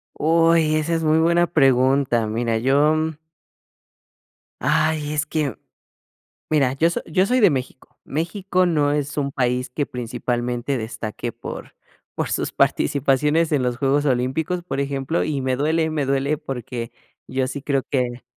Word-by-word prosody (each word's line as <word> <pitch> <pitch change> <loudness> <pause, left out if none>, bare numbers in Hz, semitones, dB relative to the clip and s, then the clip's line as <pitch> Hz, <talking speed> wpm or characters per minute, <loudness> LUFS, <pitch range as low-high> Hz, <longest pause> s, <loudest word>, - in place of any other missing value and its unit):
Uy, 165 0 +3
esa 155 +2 0
es 165 - -1
muy 155 +1 +3
buena 170 +1 +3
pregunta. 130 -5 +3
Mira, 115 +1 -1
yo 140 +6 +3 1.7
Ay, 155 -1 +1
es 150 0 -1
que 150 -6 -2 1.0
Mira, 135 -4 +3
yo 160 +5 +2
so 170 - -3
yo 185 +4 +2
soy 255 +3 +2
de 205 - +7
México. 130 -1 -6
México 180 +4 -1
no 150 -4 +2
es 145 0 -2
un 140 -1 -1
país 125 -1 -1
que 145 +3 -2
principalmente 120 +1 -3
destaque 110 +1 -5
por - - -9 0.4
por - - -2
sus - - -1
participaciones 150 +4 +2
en 140 - +2
los 125 -1 -1
Juegos 140 +2 +1
Olímpicos, 140 +7 0
por 175 - -4
ejemplo, 140 +3 -1
y 150 -3 -2
me 130 -1 0
duele, 160 +3 +1
me 150 -3 -1
duele 140 +2 0
porque 125 -5 -6 0.4
yo 130 0 -1
sí 140 +1 -5
creo 140 -1 0
que 125 -2 -1
140 Hz, 150 wpm, -22 LUFS, 130-155 Hz, 1.7 s, de